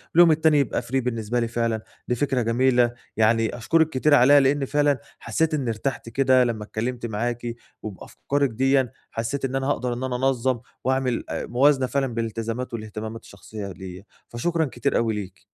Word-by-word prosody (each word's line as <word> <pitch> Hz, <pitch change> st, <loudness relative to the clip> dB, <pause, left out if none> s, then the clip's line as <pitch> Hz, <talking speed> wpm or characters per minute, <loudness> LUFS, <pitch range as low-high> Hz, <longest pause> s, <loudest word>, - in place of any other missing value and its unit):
واليوم 170 Hz, -1 st, +8 dB
التاني 155 Hz, -1 st, +4 dB
يبقى 140 Hz, -, 0 dB
free 120 Hz, +2 st, -6 dB
بالنسبة 115 Hz, -1 st, -1 dB
لي 115 Hz, -, 0 dB
فعلًا. 115 Hz, -1 st, -1 dB, 0.3 s
دي 125 Hz, -, +1 dB
فكرة 135 Hz, 0 st, 0 dB
جميلة، 120 Hz, +1 st, +3 dB, 0.2 s
يعني 115 Hz, +1 st, +2 dB
أشكرِك 160 Hz, +7 st, +2 dB
كتير 145 Hz, +1 st, +3 dB
عليها 145 Hz, +2 st, +7 dB
لأني 140 Hz, +1 st, +2 dB
فعلًا 145 Hz, -1 st, +2 dB, 0.2 s
حسّيت 155 Hz, +8 st, 0 dB
إني 140 Hz, -5 st, -1 dB
ارتحت 115 Hz, +2 st, -3 dB
كده 130 Hz, +1 st, +4 dB
لمّا 115 Hz, -3 st, -2 dB
اتكلمت 120 Hz, +3 st, -4 dB
معاكِ، 120 Hz, +2 st, -3 dB, 0.3 s
وبأفكارِك 135 Hz, +7 st, -2 dB
ديًّا 130 Hz, +1 st, +2 dB, 0.2 s
حسّيت 125 Hz, +5 st, -2 dB
إن 135 Hz, 0 st, -3 dB
أنا 135 Hz, 0 st, -1 dB
هاقدر 125 Hz, -3 st, 0 dB
إن 120 Hz, +2 st, -5 dB
أنا 130 Hz, -1 st, -2 dB
أنظم 130 Hz, -1 st, +1 dB, 0.2 s
واعمل 130 Hz, -1 st, 0 dB
آآ، -, -, -3 dB
موازنة 135 Hz, +1 st, +3 dB
فعلًا 135 Hz, +1 st, 0 dB
بين 115 Hz, 0 st, -1 dB
الالتزامات 115 Hz, +3 st, -4 dB
والاهتمامات 110 Hz, 0 st, -6 dB
الشخصية 100 Hz, +1 st, -9 dB
ليّا، 95 Hz, 0 st, -9 dB, 0.2 s
فشكرًا 160 Hz, +7 st, -1 dB
كتير 120 Hz, -4 st, -1 dB
أوي 115 Hz, -1 st, +1 dB
ليكِ. 100 Hz, -3 st, -7 dB
125 Hz, 175 wpm, -24 LUFS, 115-135 Hz, 0.3 s, واليوم